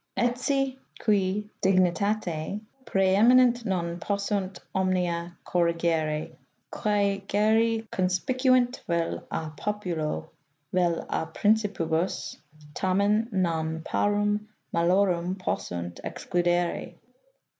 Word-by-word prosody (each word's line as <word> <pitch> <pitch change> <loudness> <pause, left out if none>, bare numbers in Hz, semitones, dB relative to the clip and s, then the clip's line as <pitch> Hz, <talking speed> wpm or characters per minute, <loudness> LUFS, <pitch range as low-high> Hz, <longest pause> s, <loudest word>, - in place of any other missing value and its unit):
Etsi 260 +2 0 0.2
qui 205 -1 +1
dignitate 185 -1 +1 0.3
prseeminent 235 +6 +5
non 175 -3 -1
possunt 200 0 -2 0.2
omnia 175 -2 0
corrigere, 165 -3 0 0.4
quae 200 -2 +1
geri 220 +2 +2
conspiciunt 250 +7 +2
vel 170 -1 -1
S. 160 -1 -3
populo, 170 -6 -3 0.4
vel 175 -2 +1
a 160 - -2
Principibus, 195 -6 0 0.4
tamen 200 +6 +2
non 160 -4 -1
parum 205 +2 0 0.3
malorum 180 +1 +2
possunt 85 - -4
excludere. 175 -1 -1
190 Hz, 80 wpm, -27 LUFS, 170-210 Hz, 0.4 s, prseeminent